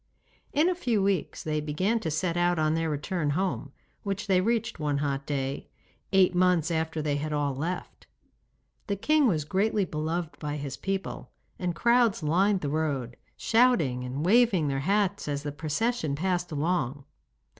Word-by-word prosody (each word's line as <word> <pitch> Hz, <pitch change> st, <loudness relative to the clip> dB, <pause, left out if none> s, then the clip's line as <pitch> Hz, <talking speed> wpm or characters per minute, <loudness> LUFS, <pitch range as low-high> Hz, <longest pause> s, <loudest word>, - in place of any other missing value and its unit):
In 305 Hz, +4 st, +3 dB
a 365 Hz, -, +3 dB
few 240 Hz, -, 0 dB
weeks 195 Hz, -4 st, -1 dB
they 155 Hz, -1 st, -1 dB
began 185 Hz, +10 st, 0 dB
to 170 Hz, -, -3 dB
set 165 Hz, +3 st, -1 dB
out 175 Hz, 0 st, +2 dB
on 155 Hz, 0 st, +2 dB
their 165 Hz, 0 st, 0 dB
return 150 Hz, +2 st, -2 dB
home, 185 Hz, -7 st, -2 dB, 0.3 s
which 200 Hz, 0 st, -3 dB
they 185 Hz, -2 st, +3 dB
reached 230 Hz, +1 st, -1 dB
one 150 Hz, -2 st, 0 dB
hot 140 Hz, -1 st, -2 dB
day, 135 Hz, -1 st, -3 dB, 0.4 s
eight 190 Hz, -2 st, +5 dB
months 180 Hz, -2 st, +3 dB
after 160 Hz, -1 st, -1 dB
they 145 Hz, -1 st, 0 dB
had 155 Hz, +2 st, -3 dB
all 145 Hz, -2 st, 0 dB
left. 165 Hz, +7 st, -5 dB, 0.8 s
The 200 Hz, -, 0 dB
king 300 Hz, +7 st, +3 dB
was 155 Hz, -8 st, 0 dB
greatly 200 Hz, +4 st, +1 dB
beloved 160 Hz, +1 st, -3 dB
by 150 Hz, -1 st, -3 dB
his 140 Hz, -3 st, -5 dB
people, 195 Hz, 0 st, -4 dB, 0.3 s
and 180 Hz, -2 st, -2 dB
crowds 235 Hz, -3 st, +3 dB
lined 185 Hz, +5 st, +2 dB
the 145 Hz, -, -2 dB
roads, 140 Hz, -5 st, -1 dB, 0.2 s
shouting 200 Hz, -, +3 dB
and 130 Hz, +5 st, -3 dB
waving 200 Hz, -7 st, +4 dB
their 135 Hz, -1 st, -1 dB
hats 200 Hz, +5 st, 0 dB
as 145 Hz, -1 st, -2 dB
the 145 Hz, -, -3 dB
procession 155 Hz, -, -1 dB
passed 180 Hz, +2 st, -1 dB
along. 145 Hz, -3 st, -1 dB
165 Hz, 165 wpm, -28 LUFS, 150-195 Hz, 0.8 s, eight